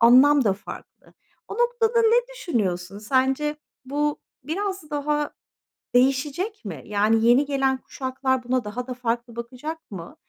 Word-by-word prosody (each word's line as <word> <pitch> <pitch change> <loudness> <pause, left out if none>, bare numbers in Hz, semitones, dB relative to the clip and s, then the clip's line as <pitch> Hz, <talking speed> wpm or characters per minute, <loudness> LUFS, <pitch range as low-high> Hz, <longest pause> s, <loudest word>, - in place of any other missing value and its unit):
anlam 260 +4 +7
da 200 - +4
farklı. 200 - -11 0.3
O - - -5
noktada 475 -1 +2
ne 455 +1 +5 0.2
düşünüyorsun, 195 - -2
sence 265 +6 +1 0.3
bu 290 +2 -1 0.2
biraz 375 +1 -3
daha 295 0 0 0.7
değişecek 275 - +1
mi? 160 -9 -6
Yani, 215 +2 +2
yeni 245 +5 +6
gelen 270 -2 +1
kuşaklar 260 -1 -2
buna 255 0 0
daha 240 +5 -5
da 255 - -3
farklı 235 -1 -2
bakacak 255 +6 -7
mı? 175 -3 -8
260 Hz, 135 wpm, -24 LUFS, 235-295 Hz, 0.7 s, anlam